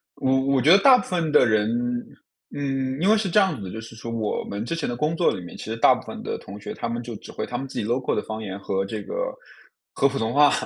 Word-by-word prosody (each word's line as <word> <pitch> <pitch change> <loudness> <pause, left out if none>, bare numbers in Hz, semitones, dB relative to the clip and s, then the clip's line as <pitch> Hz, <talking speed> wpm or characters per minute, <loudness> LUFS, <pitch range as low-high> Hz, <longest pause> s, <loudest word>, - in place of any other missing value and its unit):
我 135 0 +2 0.2
我 130 - +3
觉 155 - +5
得 195 - +9
大 260 +3 +8
部 - - -2
分 170 -4 -1
的 - - +6
人 110 -1 +2 0.9
嗯， 135 -1 -2
因 195 - +3
为 220 - +6
是 205 -3 -1
这 210 - +5
样 190 -6 +2
子 105 - -8
的， - - -7
就 110 - -6
是 115 0 -10
说 115 +1 -7
我 110 -2 -2
们 100 +3 -4
之 165 - -2
前 165 - -2
的 120 - -2
工 150 +5 0
作 170 - +3
里 95 - -5
面， 85 - -10
其 - - -7
实 110 - -3
大 - - +6
部 - - -9
分 - - -7
的 - - -3
同 100 +2 -10
学 - - -6
他 115 - -4
们 120 +1 -3
就 115 -2 -6
只 - - -12
会 - - -4
他 120 - -4
们 135 +1 -5
自 - - -5
己 105 - -2
local 125 +3 0
的 - - 0
方 110 0 -6
言 100 -1 -6
和 95 0 -1
这 105 +1 -5
个 - - -7 0.8
和 140 - +3
普 135 0 -3
通 115 +2 -1
话。 145 0 +6
120 Hz, 345 characters per minute, -24 LUFS, 110-150 Hz, 0.9 s, 得